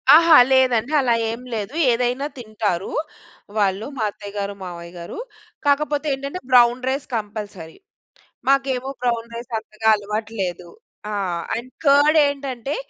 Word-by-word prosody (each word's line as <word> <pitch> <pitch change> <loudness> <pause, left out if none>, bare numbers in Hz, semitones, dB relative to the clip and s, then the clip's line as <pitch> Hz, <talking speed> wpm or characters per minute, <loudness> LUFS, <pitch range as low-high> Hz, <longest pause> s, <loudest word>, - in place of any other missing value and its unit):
ఆహా! 330 -1 +8 0.2
లేదండి. 255 -1 +3
అలా 245 -3 +2 0.2
ఏం 230 +2 -6
లేదు. 215 +2 -4 0.2
ఏదైనా 250 +3 0
తింటారు. 215 -6 -2 0.7
వాళ్ళు 200 0 +1
మా 225 - -1
అత్తయ్య 205 0 -10
గారు-మావయ్య 185 -4 -6
గారు, 170 - -8 0.5
కాకపోతే 290 +1 +1
ఏంటంటే 275 +6 -5
బ్రౌన్ 245 0 +6
రైస్ 275 +2 -2
కంపల్సరీ. 205 -6 -6 0.7
మాకేమో 270 -1 +1
బ్రౌన్ 235 -2 0
రైస్ 240 +1 -8
అంతగా 220 0 -5
అలవాటు 210 +1 -4
లేదు. 175 -1 -4 0.4
ఆ! - - -3 0.4
అండ్ 240 +3 -6
కార్డ్ 290 +2 +5
ఏంటంటే 275 -1 -4
235 Hz, 125 wpm, -22 LUFS, 205-270 Hz, 0.7 s, ఆహా